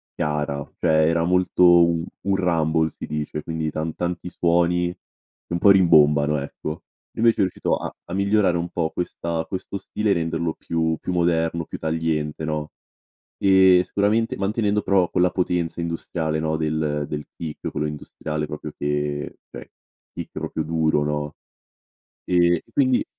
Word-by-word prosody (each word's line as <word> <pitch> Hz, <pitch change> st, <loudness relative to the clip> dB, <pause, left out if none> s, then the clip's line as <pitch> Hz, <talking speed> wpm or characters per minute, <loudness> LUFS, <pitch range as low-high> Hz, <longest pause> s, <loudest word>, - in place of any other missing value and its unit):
chiara; 75 Hz, -1 st, -2 dB, 0.2 s
cioè, 80 Hz, -2 st, +3 dB
era 85 Hz, 0 st, +1 dB
molto 90 Hz, +1 st, +2 dB
u 85 Hz, -1 st, +5 dB, 0.2 s
un 100 Hz, -, +3 dB
rumble, 80 Hz, -3 st, +1 dB
si -, -, -8 dB
dice, 75 Hz, 0 st, -4 dB
quindi, 80 Hz, -1 st, -3 dB
tan 80 Hz, +1 st, -3 dB
tanti 90 Hz, 0 st, -3 dB
suoni, 85 Hz, 0 st, +2 dB
e 90 Hz, -, -9 dB, 0.5 s
un 85 Hz, -, -1 dB
po' 100 Hz, -, +7 dB
rimbombano, 75 Hz, -5 st, +5 dB
ecco. 75 Hz, +2 st, -6 dB, 0.3 s
Invece 115 Hz, 0 st, +4 dB
è -, -, +4 dB
riuscito 95 Hz, -2 st, 0 dB
a -, -, -4 dB, 0.2 s
a 85 Hz, -, -7 dB
migliorare 100 Hz, -2 st, +2 dB
un 85 Hz, 0 st, -2 dB
po' 85 Hz, -2 st, -1 dB
questa 85 Hz, -1 st, -3 dB
questo 95 Hz, +1 st, -5 dB
stile, 105 Hz, +2 st, -2 dB
renderlo 80 Hz, -1 st, -1 dB
più 80 Hz, -1 st, -1 dB
più 90 Hz, -, -4 dB
moderno, 85 Hz, -1 st, +1 dB
più -, -, -7 dB
tagliente, 80 Hz, -1 st, -2 dB
no; 75 Hz, -1 st, -3 dB, 0.7 s
ehm, 95 Hz, -2 st, +6 dB
sicuramente 105 Hz, +5 st, 0 dB
mantenendo, 105 Hz, +1 st, 0 dB
però, 95 Hz, -3 st, +2 dB
quella 90 Hz, 0 st, +2 dB
potenza 90 Hz, -1 st, -1 dB
industriale, 85 Hz, -1 st, -2 dB
no, 80 Hz, 0 st, 0 dB
del 75 Hz, -1 st, -1 dB
del 75 Hz, -1 st, -4 dB
peak, 80 Hz, -3 st, -5 dB
quello 75 Hz, -, -1 dB
industriale, 75 Hz, 0 st, -4 dB
proprio 75 Hz, 0 st, -6 dB
che 75 Hz, 0 st, -2 dB
cioè, -, -, -10 dB, 0.4 s
peak -, -, -6 dB
proprio 80 Hz, -, -3 dB
duro, 80 Hz, -1 st, +1 dB
no. 75 Hz, 0 st, -2 dB, 0.9 s
E 85 Hz, -1 st, +3 dB
e -, -, -27 dB
quindi 130 Hz, -3 st, +2 dB
85 Hz, 155 wpm, -23 LUFS, 75-90 Hz, 0.9 s, po